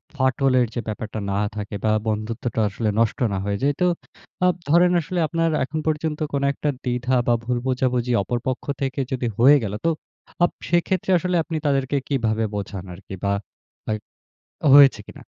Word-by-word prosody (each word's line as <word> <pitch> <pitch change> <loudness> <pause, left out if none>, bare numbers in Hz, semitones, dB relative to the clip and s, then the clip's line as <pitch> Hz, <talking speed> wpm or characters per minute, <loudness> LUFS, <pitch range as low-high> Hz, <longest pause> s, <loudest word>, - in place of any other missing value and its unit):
ফাটলের 130 -1 +2
যে, - - -2
ব্যাপারটা 110 0 -4
না 100 - 0 0.2
থাকে 105 0 -5
বা 110 - +3 0.2
বন্ধুত্বটা 110 +2 -2
আসলে 105 +2 -2
নষ্ট 115 -2 +1
না 95 - -1
হয়ে 100 0 -1
যায়। 145 +1 +3
তো 180 - +5 0.6
আ - - +6 0.2
ধরেন 175 +3 +5
আসলে 175 +3 -3
আপনার 165 +1 0
এখন 150 +4 -3
পর্যন্ত 155 0 -1
কোন 140 -1 0
একটা 150 - -2
দ্বিধা 125 +1 0
বা 120 - +4
ভুল 125 +1 -1
বোঝাবুঝি, 125 -1 0
অপর 120 +5 -2
পক্ষ 130 - -2 0.2
থেকে 135 0 -2
যদি 125 -2 -1
হয়ে 135 +5 +7
গেল? 105 -1 -3
তো - - +4 0.5
আপ 175 - +4 0.2
সেক্ষেত্রে 180 +2 +1
আসলে 180 +1 -1
আপনি 160 0 -4
তাদেরকে 140 -1 +1
কিভাবে 115 -5 0
বোঝান 100 -2 -5
আরকি 95 +2 -9
বা 100 - +1 0.6
অ্যা 110 -1 0 0.8
হয়েছে 140 -6 +8
কিনা? - - -12
130 Hz, 170 wpm, -23 LUFS, 110-145 Hz, 0.8 s, হয়েছে